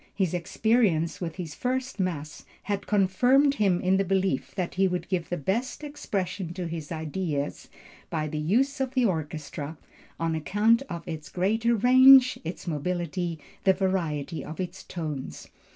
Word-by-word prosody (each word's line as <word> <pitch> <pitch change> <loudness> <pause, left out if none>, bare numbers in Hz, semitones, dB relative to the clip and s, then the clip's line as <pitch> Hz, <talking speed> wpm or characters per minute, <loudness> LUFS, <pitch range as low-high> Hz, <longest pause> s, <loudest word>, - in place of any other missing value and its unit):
His 190 -4 0
experience 180 -2 +1
with 165 -2 -4
his 170 -5 -6
first 255 - -2
mass 155 -5 -3 0.2
had 200 -1 -3
confirmed 245 +8 +4
him 195 -7 +2
in 185 +1 +2
the 195 - +2
belief 190 -5 0
that 185 -3 -2
he 190 0 +2
could 180 -1 -3
give 180 -3 -1
the 175 - -1
best 225 - -2
expression 195 - -4
to 185 -2 -3
his 165 -3 -6
ideas 155 -2 -3 0.4
by 155 -1 -2
the 150 0 -3
use 255 - +1
of 265 0 -2
the 255 -2 +3
orchestra, 155 -4 -3 0.4
on 165 0 0
account 210 - +2
of 170 0 -6
its 155 -3 -6
greater 225 +6 +1
range, 255 +3 +7
its 165 +2 -6
mobility, 175 +1 -2 0.3
the 190 - +5
variety 170 -6 -1
of 160 - -8
its 185 0 -4
tones. 155 -6 -6
185 Hz, 155 wpm, -27 LUFS, 160-210 Hz, 0.4 s, range